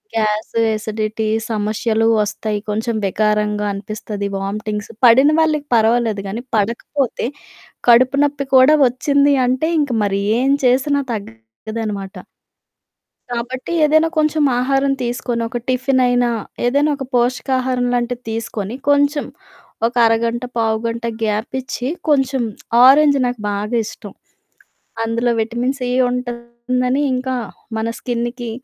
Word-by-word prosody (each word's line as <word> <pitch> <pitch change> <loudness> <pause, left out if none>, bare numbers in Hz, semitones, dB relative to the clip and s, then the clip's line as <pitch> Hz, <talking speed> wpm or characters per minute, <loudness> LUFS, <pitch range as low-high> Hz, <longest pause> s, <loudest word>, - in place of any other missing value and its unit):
Gas, 215 +1 -1 0.2
acidity 215 0 -3 0.2
సమష్యలూ 220 +1 0
వస్తయి. 210 0 -2
కొంచెం 220 +2 -1
వికారంగా 210 0 0
అనిపిస్తది, 205 0 -5
వామ్టింగ్స్. 210 +2 -4
పడిన 260 +5 +7
వాళ్ళకి 305 -2 0
పర్వాలేదు 225 -2 +2
గానీ, 230 +5 -5
పడకపోతే 235 +4 -1 0.6
కడుపు 255 +3 +5
నొప్పి 285 -1 -2
కూడా 275 +4 +7
ఒచ్చింది 280 +3 +2
అంటే, 260 +6 0
ఇంక 285 -3 -1
మరి 200 0 0 0.2
ఏం 270 +1 +2
చేసినా 280 +3 +2
తగ్గదనమాట. 195 - -7 1.1
కాబట్టి, 250 +5 -4
ఏదైనా 315 +2 +3
కొంచెం 305 0 +2 0.2
ఆహారం 270 +2 +1
తీసుకొనో, 240 -1 -2
ఒక 245 - -3
టిఫినయినా, 250 -1 +2 0.4
ఏదైనా 285 +4 +2
ఒక 270 - -5
పోషకాహారంలాంటిది 245 -1 0
తీసుకొని, 225 -1 -4
కొంచెం 285 +1 +2 0.6
ఒక 245 - -7
అరగంట, 230 +2 +1
పావుగంట 230 +1 -1 0.2
గ్యాప్పిచ్చి, 245 +4 -3 0.2
కొంచం 270 -3 +2 0.4
ఆరెంజ్ 285 +1 +6
నాకు 245 -2 -2
బాగా 210 +3 -2
ఇష్టం. 205 -2 -9 0.9
అందులో 230 +1 0
విటమిన్ 240 +4 -2
సి 250 -1 -2 0.2
ఉంటందని, 250 +2 -2
ఇంకా 260 0 -2 0.4
మన 220 +1 -1
స్కిన్న్‌కి 240 0 -3
240 Hz, 105 wpm, -18 LUFS, 220-260 Hz, 1.1 s, పడిన